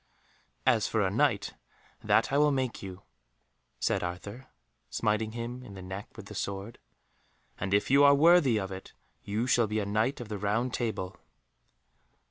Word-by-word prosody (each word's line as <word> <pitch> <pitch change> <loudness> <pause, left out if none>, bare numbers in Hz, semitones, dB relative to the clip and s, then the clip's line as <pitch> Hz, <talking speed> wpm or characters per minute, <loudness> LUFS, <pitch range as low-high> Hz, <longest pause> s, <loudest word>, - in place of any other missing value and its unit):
"As 120 -5 +3
for 110 - 0
a 95 - 0
Knight, 110 -3 +1 0.5
that - - +2
I 140 - +4
will 150 0 +4
make 130 -3 -2
you," 95 0 -8 0.8
said - - +1
Arthur, 95 +8 -6 0.4
smiting 110 0 0
him 120 +2 -5
in 105 -6 -11
the 95 - -8
neck 95 +3 -6
with 110 - -9
the 105 - -10
sword, 100 +2 -5 0.8
"and 95 - -3
if 100 +5 +2
you 140 +1 +6
are 140 0 +7
worthy 155 -5 +5
of 95 -2 -3
it 95 0 -9 0.3
you 105 +4 -2
shall 120 -3 +3
be 105 +1 -2
a 105 - -2
Knight 110 +7 0
of 120 - -7
the 105 -1 -5
Round 115 +5 0
Table." 110 -6 -3
110 Hz, 170 wpm, -29 LUFS, 100-125 Hz, 0.8 s, are